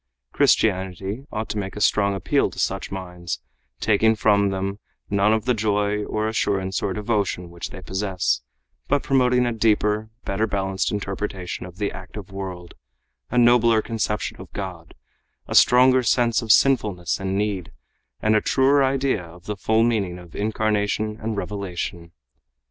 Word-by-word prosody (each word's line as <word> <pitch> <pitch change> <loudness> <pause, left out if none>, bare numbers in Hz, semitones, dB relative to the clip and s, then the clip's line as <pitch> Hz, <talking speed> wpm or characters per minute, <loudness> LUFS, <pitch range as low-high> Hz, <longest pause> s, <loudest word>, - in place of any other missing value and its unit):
Christianity 95 - +1
ought 110 0 -3
to 105 - -2
make 95 -1 -5
a - - -5
strong 100 -1 +2
appeal 95 - +1
to - - -14
such - - -1
minds, 90 -2 -5 0.4
taking 110 +1 +3
from 100 -2 +3
them 95 +1 -3 0.3
none 100 +1 +3
of 110 0 +1
the 125 - +3
joy 105 -1 0
or 110 0 -1
assurance 95 -4 -1
or 100 - -1
devotion 100 -4 -1
which 85 -1 -6
they 95 - -10
possess, 95 -1 -1 0.5
but 145 0 +1
promoting 125 -2 +3
a 120 - 0
deeper, 110 -1 +1 0.2
better 105 +3 0
balanced 95 -2 -1
interpretation 95 -3 -4
of 90 0 -13
the 105 -1 -1
active 95 +1 -9
world, 95 -3 -7 0.6
a 125 - -2
nobler 120 -2 +5
conception 110 -2 -2
of - - -12
God, 90 -4 -7 0.5
a - - -4
stronger 130 +1 +6
sense 120 0 +2
of 115 -2 +1
sinfulness 105 -10 +3
and 95 0 -2
need, 100 -4 -2 0.5
and 110 0 +3
a 105 - +4
truer 135 +1 +3
idea 135 -5 +1
of 85 +1 -14
the 105 - -3
full 110 +3 +2
meaning 105 -7 0
of 90 -2 -13
incarnation 105 0 -1
and 110 -1 -3
revelation. 90 -3 -4
105 Hz, 155 wpm, -23 LUFS, 95-110 Hz, 0.6 s, stronger